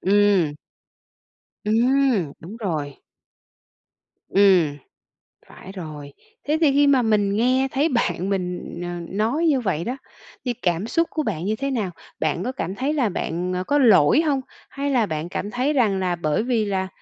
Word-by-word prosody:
ừm. 195 -6 +3 1.1
Ừm, 230 - +2
đúng 195 +8 -9
rồi. 155 -10 -3 1.3
Ừm, 185 -7 +4 0.7
phải 190 - -12
rồi. 150 -6 -8 0.3
Thế 300 +2 +2
thì 300 -4 +5
khi 285 +1 +4
mà 275 -2 +4
mình 210 -3 +2
nghe 255 +4 +2
thấy 290 +5 +1
bạn 190 - 0
mình, 180 -3 -3
ờ, - - -4 0.2
nói 230 - 0
như 285 -4 +3
vậy 170 -7 -1
đó, 250 +6 -3 0.5
thì 245 - 0
cảm 180 -3 -1
xúc 330 +7 +1
của 310 - -1
bạn 185 - -3
như 215 - 0
thế 275 +4 -3
nào? 215 -8 -1 0.3
Bạn 155 +3 -1
có 250 - -2
cảm 190 -7 -4
thấy 270 +7 -1
là 265 -8 +1
bạn, 180 0 -3
à, 180 - -2
có 290 +9 +1
lỗi 235 - +5
hông? 290 -5 0 0.3
Hay 280 +1 -3
là 245 -5 +3
bạn 155 -1 -4
cảm 205 +3 -4
thấy 255 +5 0
rằng 215 -8 +2
là 180 -2 0
bởi 155 +3 0
vì 235 -3 +1
là, 190 -2 -1
210 Hz, 175 wpm, -23 LUFS, 180-260 Hz, 1.3 s, thì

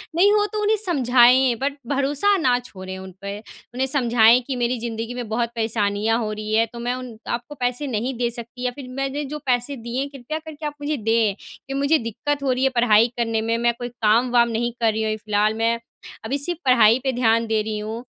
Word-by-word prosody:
नहीं 390 +4 +5
हो 415 -1 +3
तो 425 - -1
उन्हें 425 +1 +2
समझाएँ 255 -5 +4
बट 280 +1 0
भरोसा 285 +8 +2
ना 255 -7 +2
छोड़ें 190 -6 -9
उन 190 0 -9
पे। 200 +1 -5 0.4
उन्हें 260 +2 -1
समझाएँ 240 -3 +4
कि 270 - -2
मेरी 245 0 -1
ज़िंदगी 230 0 -4
में 245 -2 -5
बहुत 235 +1 0
परेशानियाँ 220 -1 0
हो 215 -2 -2
रही 215 0 -4
हैं 225 +1 +3
तो 235 - -7
मैं 240 +1 -1
उन 250 -3 -8
आप 235 - -1
को 295 - -8
पैसे 250 +3 -1
नहीं 245 +2 -2
दे 240 0 0
सकती 240 +1 -7
या 250 - +1
फिर 275 -3 -9
मैंने 275 +2 -2
जो 300 - -4
पैसे 250 +2 0
दिए 235 +2 -4
हैं 280 - -3
कृपया 280 +3 -6
करके 315 -1 -9
आप 295 - -3
मुझे 295 +1 -1
दें 225 -2 +1 0.3
कि 270 - -5
मुझे 280 +3 +2
दिक्कत 280 +4 -3
हो 270 - +1
रही 255 +1 0
है 270 - +4
पढ़ाई 230 -2 +5
करने 225 -2 0
में, 230 +1 0
मैं 235 0 +2
कोई 245 0 -4
काम-वाम 235 +1 +2
नहीं 235 +1 -1
कर 225 - +4
रही 220 +1 -2
हूँ - - 0
अभी 215 - -2
फिलहाल 210 0 +1
मैं 230 +1 +1 0.5
अभी 270 +6 -1
सिर्फ़ 335 +4 -2
पढ़ाई 235 -2 +5
पे 265 - +1
ध्यान 230 -1 +2
दे 220 -1 +1
रही 215 0 -3
हूँ। 220 +3 -5
240 Hz, 230 wpm, -22 LUFS, 225-270 Hz, 0.5 s, नहीं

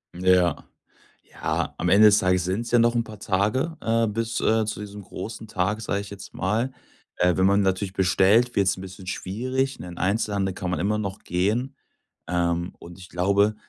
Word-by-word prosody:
Ja. 90 -1 +3 0.6
Ja, - - -3
am 90 - -1
Ende 105 +4 +7
des 105 0 +5
Tages 90 -1 +2
sind's 100 +6 -2
ja 120 - +6
noch 120 +1 +4
'n 115 -1 +1
paar 110 -2 -11
Tage, 105 - 0
äh, 115 0 +1
bis, 115 +2 -2
äh, 110 0 +2
zu 105 - -4
diesem 105 0 -8
großen 110 +3 -8
Tag, 105 +4 -1
sag 100 -2 -1
ich 100 0 -8
jetzt 100 -2 -10
mal. 110 +8 -1 0.4
Äh, 90 -1 +2
wenn 95 0 +3
man 100 +1 +4
natürlich 95 0 -1
bestellt, 100 +6 +3
wird's 95 -1 +2
'n 95 - -9
bisschen 95 0 -10
schwierig. 130 +9 -2
'N - - -7
in 85 - -9
Einzelhandel 100 -1 0
kann 90 -1 -4
man 90 - -1
immer 105 +5 0
noch 100 -2 -4
gehen. 110 +10 -1 0.5
Ähm, 85 0 -1
und 85 +2 -12
ich 90 - -12
glaube, 100 +4 +2
100 Hz, 195 wpm, -24 LUFS, 95-110 Hz, 0.6 s, Ende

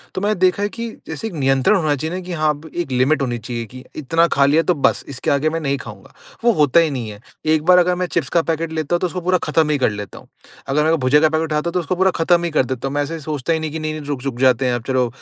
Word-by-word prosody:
तो 185 - -2
मैंने 210 +1 +1
देखा 185 +2 +2
है 205 - 0
कि 230 +2 -5 0.2
जैसे 160 +8 -5
एक 215 - -8
नियंत्रण 135 +5 +2
होना 155 -5 +1
चाहिए 160 +5 -4
न - - -5
कि 180 0 -6
हाँ, 155 -2 0
एक 175 -5 -3
लिमिट 130 +4 +2
होनी 120 -3 -1
चाहिए 115 +1 -5
कि 130 +3 -12
इतना 165 +3 +2
खा 140 -4 +3
लिया 150 +4 +4
तो 180 - +2
बस, 145 - +1
इसके 135 -2 -2
आगे 140 +2 +2
मैं 165 +1 -2
नहीं 140 -3 -1
खाऊँगा, 105 -6 -11 0.3
वो - - +1
होता 150 -2 +4
ही 165 -1 +3
नहीं 125 -5 -4
है। 105 -1 -10 0.3
एक 155 -1 +2
बार 180 +1 +6
अगर 180 0 +2
मैं 180 +1 -1
चिप्स 160 -7 -2
का 170 - +5
पैकेट 165 0 -2
लेता 160 +1 -1
हूँ - - 0
तो 180 - 0
उसको 180 +1 -5
पूरा 185 +1 +2
ख़त्म 155 0 +1
ही 150 - +2
कर 130 - +2
लेता 105 -2 -7
हूँ। - - -18 0.4
अगर 140 +3 +1
मेरे 160 - +2
को 165 - +3
भुजिया 130 +4 +4
का 155 - +4
पैकेट 160 +1 0
उठता - - +1
हूँ 170 - -1
तो 180 - +1
उसको 175 +1 -2
पूरा 190 +1 +3
ख़त्म 170 +1 +2
ही 170 - -2
कर 150 -4 +2
देता 130 +1 -4
हूँ। 135 - -5
मैं 145 - +1
ऐसे 165 +3 -5
सोचता 150 0 -2
ही 160 - 0
नहीं 155 -1 -4
कि 160 - -4
नहीं-नहीं 155 -1 -4
रुक 145 -3 -3
रुक 135 -3 -4
जाते 130 0 +3
हैं 125 - +1
अब 120 - -5
चलो 130 -2 +1
155 Hz, 310 wpm, -19 LUFS, 135-170 Hz, 0.4 s, बार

